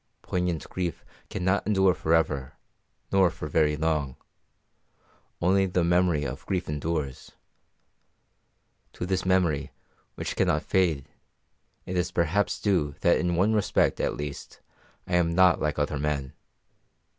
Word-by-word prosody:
Poignant 90 -3 -2
grief 90 -3 -4 0.2
cannot 95 +1 0
endure 95 -3 +4
for 80 0 +1
ever, 70 -5 0 0.6
nor 95 -2 +4
for 75 - -7
very 75 0 +2
long; 75 -4 -1 1.2
only 95 +2 +3
the 90 -1 0
memory 85 -3 +2
of - - -5
grief 95 -2 -1
endures. 75 -2 -3 1.6
To - - -4
this 95 0 -1
memory, 85 -7 +2 0.5
which - - -4
cannot - - +1
fade, 85 -8 +1 0.8
it 90 - -4
is 90 -2 0
perhaps 85 +5 0
due 80 -9 0
that 85 - +4
in 90 -1 0
one 100 +6 +3
respect 105 -1 +1
at - - -1
least 75 -1 -7 0.5
I 90 - +1
am 85 -1 +1
not 90 -1 +5
like 75 -1 -1
other 75 0 -1
men. 70 -2 -2
85 Hz, 135 wpm, -27 LUFS, 75-95 Hz, 1.6 s, not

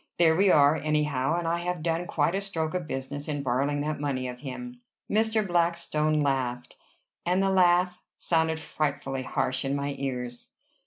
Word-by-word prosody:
There 160 -2 +5
we 195 +3 +4
are, 145 -2 +6
anyhow; 150 -1 0
and 175 -1 -2
I 170 +1 +1
have 175 -2 -3
done 170 +1 -1
quite 155 +2 +1
a 195 - 0
stroke 165 -5 -2
of 180 -3 -3
business 145 +1 -5
in 145 -2 -2
borrowing 140 +3 0
that 150 0 -2
money 135 -3 -2
of 125 0 -7
him." 245 - -7 0.3
Mr. 220 0 +1
Blackstone 170 -4 +1
laughed, 125 -3 -1 0.5
and 180 +2 +2
the 195 - +2
laugh 180 -1 +3 0.2
sounded 160 -1 +1
frightfully 140 -4 -2
harsh 130 0 -1
in 135 0 -1
my 140 0 -2
ears. 125 -3 -4
155 Hz, 170 wpm, -27 LUFS, 140-175 Hz, 0.5 s, are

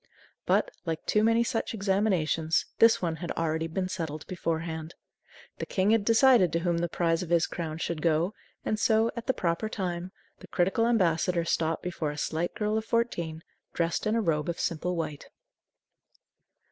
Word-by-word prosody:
But, - - +2
like 165 -1 -4
too 210 - +2
many 230 +1 +4
such 225 -1 -2
examinations, 190 -6 +1
this 225 -4 +5
one 165 -2 -1
had 170 +1 -5
already 160 0 -1
been 185 +3 -2
settled 160 -5 -4
beforehand. 165 -2 -3 0.6
The - - -4
King 190 +2 +1
had 225 -2 +3
decided 230 - +5
to 170 - +2
whom 170 -1 0
the 175 0 -1
prize 165 0 +1
of 180 - -5
his 170 -1 +3
crown 160 -2 -5
should 165 -1 -3
go, 165 +4 +1 0.3
and 215 - 0
so, 220 +1 +3
at 235 -1 -6
the 260 - +3
proper 170 +5 -1
time, 180 -3 -3 0.3
the - - -13
critical 195 +6 +1
ambassador 175 -5 +2
stopped 165 -1 0
before 170 -4 -2
a 145 - -6
slight 160 +3 -2
girl 210 +1 0
of 220 - -8
fourteen, 170 -9 -1 0.3
dressed 170 +4 -1
in 215 - +1
a 230 - +2
robe 165 -4 0
of 170 - -3
simple 180 +2 -1
white. 155 - -4
175 Hz, 175 wpm, -28 LUFS, 165-215 Hz, 0.6 s, this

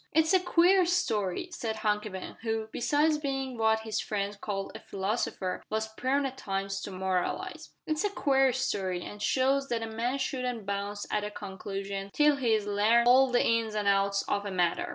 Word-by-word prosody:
"It's 320 +3 +3
a 375 - +6
queer 365 +1 +4
story," 235 - 0
said 230 -10 -3
Hunky 210 0 +1
Ben, 190 -1 -7
who, 220 -1 -2
besides 300 +4 +2
being 270 -3 -3
what 220 -1 +2
his 220 -1 -2
friends 205 -1 -2
called 200 -1 -4
a - - -8
philosopher, 195 -2 -2
was 220 0 -2
prone 270 +5 0
at 265 0 -5
times 195 -1 -3
to - - -5
moralise. 185 -1 -2 0.2
"It's 310 +3 -1
a 415 - +2
queer 270 -8 +3
story, 190 -8 -1
an' 205 - -8
shows 275 +4 +1
that 230 -1 -1
a - - -3
man 235 +4 -2
shouldn't 250 -5 -3
bounce 200 +1 -3
at 210 - 0
a 210 - -3
conclusion 195 0 -5
till 295 -1 +4
he's 225 -5 +1
larned 215 +4 +3
all 260 +2 +6
the 245 - +3
ins 230 -2 +1
an' 210 -1 -1
outs 200 0 +2
of 205 - -1
a 205 - -4
matter." 180 -3 0
220 Hz, 190 wpm, -29 LUFS, 200-265 Hz, 0.2 s, a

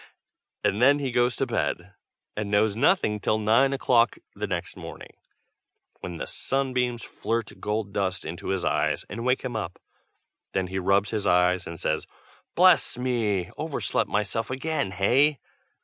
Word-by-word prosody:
and 105 - +1
then 140 +3 +6
he 140 -3 -2
goes 120 0 +2
to 135 - 0
bed, 100 -5 -2 0.4
and 105 -1 -3
knows 105 0 +2
nothing 115 - +2
till 110 - +1
nine 115 +6 +3
o'clock 120 -4 +3 0.2
the - - -3
next - - -3
morning, - - -9 0.9
when 90 -2 -6
the - - -4
sunbeams 125 -3 -1
flirt 115 -1 -3
gold 105 -1 -2
dust 95 -3 -1
into 80 +2 -6
his 95 -3 -1
eyes - - 0
and 115 +5 -5
wake 125 +1 +1
him 125 -3 -4
up. 90 -5 -4 0.8
Then 95 -1 0
he 95 +1 -2
rubs 100 +2 +2
his 110 -2 -1
eyes, 90 0 +3
and 85 -1 -7
says 80 - -1 0.5
"Bless - - +5
me! 110 -7 0
overslept 155 -2 -1
myself 105 +2 -1
again, 135 -3 -1
hey? 130 +10 +3
110 Hz, 155 wpm, -26 LUFS, 95-125 Hz, 0.9 s, then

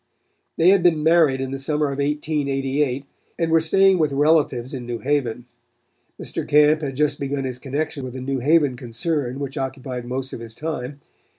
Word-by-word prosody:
They 165 +2 +5
had 195 -1 +5
been 165 -3 +3
married 160 -5 +4
in 135 0 -3
the 135 - -4
summer 150 +1 0
of 140 - -5
1888 140 -2 -1 0.3
and 165 -1 0
were 165 - +5
staying 190 +3 +4
with 150 -3 +1
relatives 145 -3 +2
in 125 -3 -6
New 120 -1 -3
Haven. 125 -3 -1 0.7
Mr. - - -5
Camp 150 +1 +4
had 135 -3 -4
just 150 +1 0
begun 140 0 -2
his 130 -2 -4
connection 140 +2 -3
with 130 0 -7
a - - -5
New 135 +1 -2
Haven 145 0 +3
concern 125 +2 -2
which 140 -1 -5
occupied 130 -2 -5
most 130 +2 -4
of - - -6
his 115 -1 -9
time. 145 -3 -5
140 Hz, 185 wpm, -22 LUFS, 130-155 Hz, 0.7 s, They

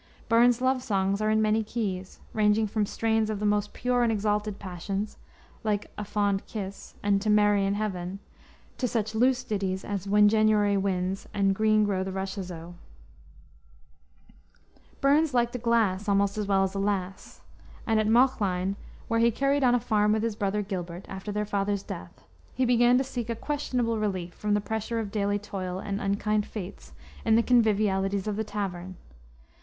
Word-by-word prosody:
Burns's 240 +1 +4
love 260 0 +2
songs 200 -2 0
are 215 - +1
in 220 0 +3
many 215 +1 +2
keys, 195 -5 -4
ranging 215 0 +3
from 210 0 -1
strains 220 0 0
of 215 -2 -2
the 210 - -2
most 210 0 +1
pure 245 0 0
and 235 -1 +3
exalted 210 -1 -1
passion, 195 +2 -4 0.6
like 210 -2 -1
Ae 210 - -4
Fond 200 -1 0
Kiss 200 -3 -7
and 200 -1 +2
To 215 - -1
Mary 205 -1 +4
in 200 - 0
Heaven, 190 -3 -3 0.6
to 250 - +1
such 220 -2 -2
loose 250 +3 +2
ditties 195 -2 -2
as 200 -1 -4
When 210 +1 +5
Januar' 210 -2 +3
Winds 190 0 -2
and 195 -1 +3
Green 215 +1 +3
Grow 195 -2 0
the 190 - -4
Rashes 190 -1 -4
O. 170 +1 -8 2.3
Burns 285 +1 +3
liked 240 0 +2
a - - -2
glass 220 -4 +1
almost 200 0 +2
as 210 -2 -2
well 195 -1 +3
as 190 0 -1
a 200 - -3
lass, 195 -2 -3 0.4
and 220 -1 +2
at 215 - +1
Mauchline, 200 -6 +2 0.3
where 230 0 +1
he 235 +1 +5
carried 275 +4 +1
on 245 -1 +5
a - - +2
farm 210 -2 +2
with 220 0 0
his 230 -2 -1
brother 205 0 -1
Gilbert, 180 -2 -5
after 195 +2 -6
their 210 +1 -1
father's 200 -1 -1
death, - - -9 0.3
he 260 - +2
began 240 0 +4
to 265 - +2
seek 245 -3 -5
a 230 - -1
questionable 245 -4 -1
relief 185 -5 -2
from 210 -1 -1
the 205 - +1
pressure 220 +2 -3
of 215 -3 -3
daily 205 -1 0
toil 190 -3 -5
and 200 +1 -4
unkind 210 +1 0
fates, 200 -2 -8 0.3
in 220 - +4
the 230 - +4
convivialities 200 -5 +2
of 210 -1 -2
the 220 - -1
tavern. 185 -3 -5
210 Hz, 180 wpm, -27 LUFS, 195-225 Hz, 2.3 s, When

